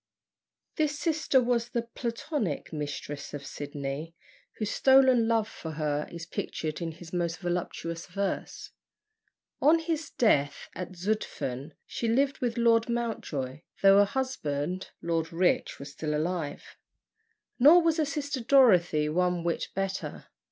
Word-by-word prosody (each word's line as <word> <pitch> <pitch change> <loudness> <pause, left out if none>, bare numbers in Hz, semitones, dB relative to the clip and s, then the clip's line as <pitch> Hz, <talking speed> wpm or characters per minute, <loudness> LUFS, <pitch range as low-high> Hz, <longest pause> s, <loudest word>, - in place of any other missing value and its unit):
This 300 -2 +1
sister 300 -3 +2
was 240 -1 +1
the 235 -1 -1
(Platonic?) 235 - -3
mistress 145 -1 -5
of 140 -1 -7
Sydney, 145 +3 -5 0.4
whose 215 -2 -2
stolen 260 -3 +5
love 225 -2 +2
for 160 -6 -7
her 150 -1 -1
is 170 -1 -7
pictured 155 -1 -4
in 165 -1 -3
his 165 +1 -12
most 175 -1 -1
voluptuous 175 -1 -3
verse. 195 +1 -3 0.9
On 310 +3 +6
his 325 -2 -2
death 145 - +1
at 180 +1 -6
Zütphen, 170 -8 -3
she 230 - -3
lived 270 +4 +2
with 240 -1 -1
Lord 230 0 +4
Montjoy, 155 - -3 0.2
though 195 0 +8
her 205 - +6
husband, 185 - -2
Lord 165 -1 -1
Rich, 175 +2 +1
was 140 +1 -8
still 150 +1 -3
alive. 155 -1 -3 0.8
Nor 320 +7 +8
was 330 -1 +2
her 310 - +2
sister 285 -1 -3
Dorothy 185 - +5
one 180 +2 +1
whit 170 -1 -1
better. 195 0 -4
185 Hz, 135 wpm, -28 LUFS, 160-245 Hz, 0.9 s, though